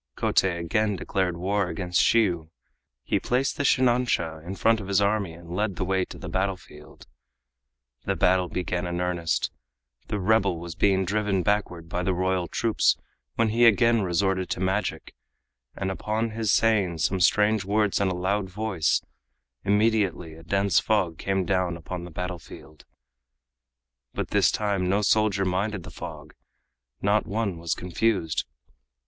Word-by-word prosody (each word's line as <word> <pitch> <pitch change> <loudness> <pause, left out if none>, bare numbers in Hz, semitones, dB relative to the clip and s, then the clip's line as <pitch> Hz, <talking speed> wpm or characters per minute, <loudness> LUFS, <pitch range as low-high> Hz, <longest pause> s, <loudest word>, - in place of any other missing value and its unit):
Kotei 90 -3 +1
again 105 +5 0
declared 90 -1 -1
war 95 +2 0
against 90 +1 0
Shiyu. 90 -9 +2 0.5
He - - 0
placed 130 +2 0
the 145 - -1
shinansha 120 - +1
in 90 +3 -6
front 115 +2 +3
of 100 - -7
his 100 0 +2
army 100 -3 +1
and 85 +1 -9
led 105 -1 -1
the 95 - -2
way 95 0 +1
to - - -11
the 90 - -8
battlefield. 90 -4 -5 1.0
The - - 0
battle 90 -1 +2
began 90 -1 -2
in 85 0 -3
earnest. 90 -2 -1 0.6
The 105 - -2
rebel 95 -3 +2
was 85 0 -7
being 95 +1 +2
driven 100 -1 0
backward 90 -5 -1
by 90 +2 -2
the 90 0 0
royal 95 -1 0
troops 110 +6 +2 0.4
when 115 -1 +2
he 115 +2 +5
again 115 +1 +4
resorted 95 0 0
to - - -2
magic, 95 +3 -2 0.6
and 95 - -2
upon 110 +4 -2
his 110 -2 0
saying 100 -7 +2
some 95 +4 0
strange 105 +3 +3
words 105 +1 +1
in 100 - +2
a 95 - -1
loud 95 +2 -1
voice, 95 -4 0 0.6
immediately 100 -5 +1
a 80 - -13
dense 100 +3 +2
fog 95 -7 0
came 95 -1 0
down 90 -3 0
upon 85 +1 -6
the - - -9
battlefield. 85 -3 -8 1.3
But - - -3
this - - +4
time 100 -4 0
no 100 +2 +2
soldier 100 -2 +2
minded 95 +1 -1
the - - -10
fog, - - -9 0.7
not 105 +1 +2
one 100 -4 -2
was 85 -1 -1
confused. 90 -2 -1
95 Hz, 155 wpm, -26 LUFS, 90-105 Hz, 1.3 s, he